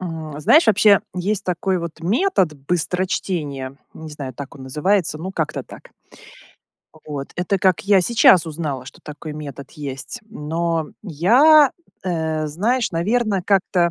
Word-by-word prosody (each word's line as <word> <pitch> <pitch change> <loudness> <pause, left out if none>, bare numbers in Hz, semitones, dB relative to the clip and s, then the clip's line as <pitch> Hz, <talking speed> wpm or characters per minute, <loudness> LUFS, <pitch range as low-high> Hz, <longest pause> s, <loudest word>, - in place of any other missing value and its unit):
М, 160 -4 -6
знаешь, 305 - +5
вообще, 205 -1 +5
есть 195 +3 -2
такой, 185 +1 -1
вот, 170 -1 -7
метод 195 - +1
быстрочтение. 165 -6 -2 0.2
Не 160 -1 -9
знаю, 135 -4 -7
так 140 +1 -8
он 135 -2 -11
называется, 155 +4 0
ну, 185 +4 -5
как-то 155 -5 -2
так. - - -14 1.0
А, - - -18
вот, 145 -2 -6
это 185 +2 0
как 185 -1 +2
я 200 -1 +4
сейчас 185 -4 +5
узнала, 150 -5 -4
что - - -13
такой 150 +1 -8
метод 145 -2 -8
есть, 145 - -6
но 165 -2 -2 0.2
я, 245 - +5 0.3
э, 160 -3 -1
знаешь, 215 - 0
наверно, 200 +3 0
как-то 180 -2 +2
170 Hz, 140 wpm, -21 LUFS, 150-195 Hz, 1.0 s, знаешь